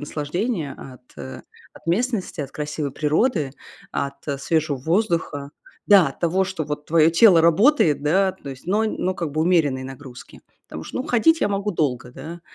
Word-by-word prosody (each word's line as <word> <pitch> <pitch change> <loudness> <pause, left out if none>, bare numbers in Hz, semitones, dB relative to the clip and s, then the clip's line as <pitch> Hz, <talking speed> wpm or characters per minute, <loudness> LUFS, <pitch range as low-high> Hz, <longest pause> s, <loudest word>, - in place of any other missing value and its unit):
наслаждение 155 - -3
от, 130 -1 -12
э, 65 -2 -8 0.3
от - - -17
местности, 200 - -1
от 140 - -5
красивой 150 -1 -4
природы, 155 - 0 0.4
от 140 0 -2 0.3
свежего 155 -2 0
воздуха. 165 - -1 0.4
Да, 195 -8 +6
от 135 - -12
того, 180 +3 +1
что 180 -4 -4
вот 150 0 -5
твоё 165 0 +4
тело 170 -1 +6
работает, 170 - +4
да, 190 +5 +2
то 145 - -12
есть 135 +4 -11
но 210 +4 +1
но 185 -3 -2
как 165 -5 -4
бы 155 +1 0
умеренные 150 -7 +2
нагрузки. 135 -1 -11 0.3
Потому 80 - -8
что - - -8
ну 255 - -1
ходить 315 +7 +3
я - - +2
могу 200 +1 -1
долго, 125 -7 -1
да, 170 +5 -9
160 Hz, 170 wpm, -22 LUFS, 145-190 Hz, 0.4 s, Да